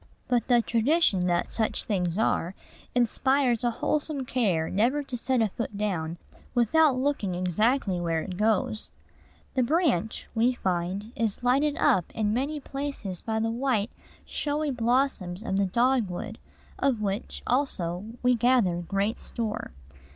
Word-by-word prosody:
But 245 -3 +1
the 240 -2 +4
tradition 230 - +3
that 175 -1 0
such 220 -2 0
things 180 -4 -1
are 190 -4 0 0.4
inspires 250 0 +2
a 240 - +3
wholesome 290 +3 -1
care 195 -11 +1
never 245 +9 +1
to 270 -2 -5
set 245 0 +1
a 215 - +1
foot 210 0 -5
down 175 -6 -2 0.4
without 260 +4 +4
looking 255 -9 0
exactly 190 +2 +1
where 165 -2 0
it 185 - -6
goes. 215 +1 0 0.6
"The 260 - +2
branch," 250 - +1
we 240 +2 +3
find, 190 +1 -2
is 225 0 -2
lighted 280 +4 +2
up 180 -3 +3
in 210 -1 +1
many 280 +5 -1
places 275 -10 -5
by 220 -1 -2
the 225 0 0
white, 240 -3 0 0.3
showy 295 0 -1
blossoms 235 -6 0
of 195 -4 -1
the 200 -1 +2
dogwood, 225 -2 0 0.4
of 250 -6 +1
which, 200 +1 -3
also, 195 -9 -1 0.2
we 250 0 +5
gather 240 -7 +3
great 195 +6 -1
store. 220 -2 -4
225 Hz, 145 wpm, -27 LUFS, 195-260 Hz, 0.6 s, we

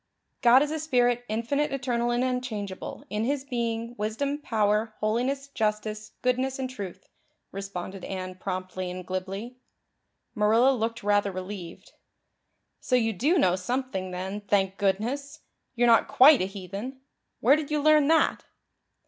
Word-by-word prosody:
"'God 250 +3 +7
is 295 - -3
a 315 - -2
spirit, 245 -5 +2
infinite, 235 +7 0
eternal 245 -3 -1
and 240 +1 +1
unchangeable, 235 -7 -4
in 210 +1 -1
His 275 +2 -1
being, 235 -3 -3
wisdom, 275 +8 -1
power, 215 -4 0
holiness, 250 +6 0
justice, 215 -3 -2
goodness, 255 +1 +1
and 265 -1 -2
truth,'" 195 -7 -8 0.4
responded 195 -1 -6
Anne 185 -1 -5
promptly 185 0 -4
and 180 0 -6
glibly. 195 +6 -5 0.8
Marilla 225 +5 +4
looked 230 -2 -2
rather 205 -1 +2
relieved. 185 -2 -8 0.9
"So 255 - 0
you 225 -2 +2
do 295 - +2
know 180 - +4
something 195 -1 -3
then, 190 +3 -4
thank 195 -1 +1
goodness! 250 +10 -1 0.3
You're 240 0 +3
not 230 -1 +5
quite 275 -1 +7
a - - +1
heathen. 200 +7 -7 0.4
Where 265 +6 +5
did 305 -2 -3
you 300 0 +1
learn 305 -1 +5
that?" 320 +1 +2
225 Hz, 140 wpm, -27 LUFS, 195-260 Hz, 0.9 s, God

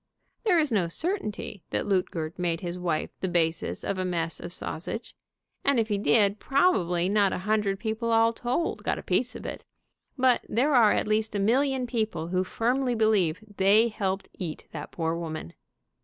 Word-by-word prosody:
There 370 -5 +4
is 305 -5 +2
no 195 -6 +2
certainty 215 - -3
that - - -1
Luetgert 180 -4 -1
made 170 -2 -1
his 175 0 -4
wife 170 -3 -1
the 190 - -1
basis 165 -2 0
of 195 -1 -2
a - - 0
mess 170 -2 -2
of 170 - -7
sausage, 180 +6 -4 0.5
and 280 -3 +3
if 225 0 0
he 205 -1 0
did 205 -1 +3
probably 185 - +2
not 200 -1 +3
a - - -1
hundred 210 -2 +1
people 220 +1 -2
all 225 0 +4
told 250 +8 -2
got - - 0
a - - -7
piece - - 0
of - - -8
it, - - -6 0.5
but 255 -2 +3
there 270 +7 +2
are 230 -5 +6
at - - 0
least 215 0 0
a - - 0
million 260 +5 +2
people 215 -9 -2
who 185 +1 +1
firmly 245 +5 0
believe 210 -4 +2
they 205 +4 +5
helped 195 -2 -2
eat 170 -5 -5
that 150 -2 -7
poor 165 -1 -1
woman. 160 - -5
205 Hz, 185 wpm, -27 LUFS, 175-230 Hz, 0.5 s, are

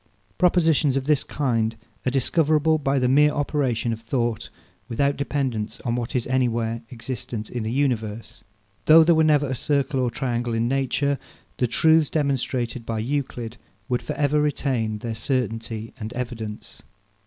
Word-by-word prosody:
Propositions 160 -6 +3
of 135 - -2
this 150 -2 +2
kind 115 -5 -1 0.3
are - - +5
discoverable 155 +3 +2
by 140 -1 +1
the 125 -1 +2
mere 145 +4 +5
operation 140 -5 0
of 115 - -7
thought, 115 -1 -2 0.4
without 140 +4 +1
dependence 135 -6 -2
on 120 - -1
what 120 0 -3
is 125 - 0
anywhere 120 -3 0
existent 120 -2 -5
in 120 - -3
the 110 +1 -2
universe. 115 -5 -2 0.4
Though 160 +1 +9
there 165 +1 +4
never 150 -2 +4
were 135 - -4
a - - -1
circle 140 +1 0
or 125 -1 +1
triangle 120 -1 -2
in 115 +1 +1
nature, 135 +2 0 0.4
the 125 - +1
truths 160 +5 +4
demonstrated 130 -5 -1
by 115 0 -3
Euclid 120 -1 -3 0.3
would 125 -1 0
for 150 - -4
ever 150 0 +2
retain 130 -7 0
their 115 +2 -4
certainty 115 -2 -3
and 110 0 -5
evidence. 115 -4 -6
130 Hz, 155 wpm, -24 LUFS, 115-145 Hz, 0.4 s, Though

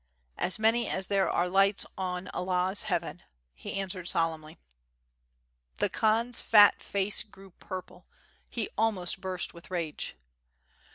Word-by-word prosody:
"As 185 - +2
many 225 +2 +2
as 190 0 -2
there 195 -1 +2
are 175 - +1
lights 195 +2 +3
on 185 -1 -3
Allah 180 0 0
*s 205 - +1
Heaven/' 175 -3 -2 0.3
he - - -7
answered 190 -2 -4
solemnly. 160 -1 -1 1.2
The - - +1
Khan's 230 +2 +1
fat 205 -2 +6
face 200 +1 0
grew 195 -3 -14
purple, 185 +1 -9 0.4
he 230 -3 -2
almost 195 -5 0
burst 185 -1 -1
with 170 +1 -14
rage. 170 - -3
190 Hz, 130 wpm, -29 LUFS, 180-205 Hz, 1.2 s, fat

